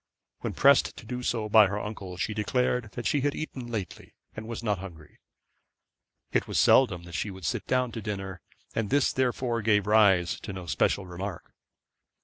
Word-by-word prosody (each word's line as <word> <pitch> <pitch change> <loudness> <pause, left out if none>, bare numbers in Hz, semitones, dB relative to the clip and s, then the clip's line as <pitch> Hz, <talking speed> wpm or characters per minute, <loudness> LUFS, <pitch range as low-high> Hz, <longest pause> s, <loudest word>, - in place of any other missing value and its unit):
When - - -4
pressed 140 0 +4
to - - -11
do 125 +2 -4
so 115 -3 -1
by 110 -1 +7
her 100 +2 -3
uncle, 100 -4 -6
she 90 +5 -2
declared 125 +2 0
that 120 - -6
she 145 - +1
had 145 +1 0
eaten 130 -5 -6
lately 110 -7 -6 0.2
and 110 0 -7
was 115 0 -6
not 105 -4 0
hungry. 85 -5 -11 1.1
It - - +1
was - - -2
seldom 100 -10 +4
that 85 0 -12
she 80 +7 -2
would 95 -3 -9
sit - - -2
down 125 -1 +1
to 115 - -6
dinner, 95 -3 -5 0.3
and 110 -3 -1
this 140 0 +2
therefore 125 -2 0
gave 105 -2 +2
rise 100 -5 +4
to 100 - -7
no 95 -1 -7
special 90 +4 +1
remark. 90 +1 -7
105 Hz, 185 wpm, -28 LUFS, 95-120 Hz, 1.1 s, by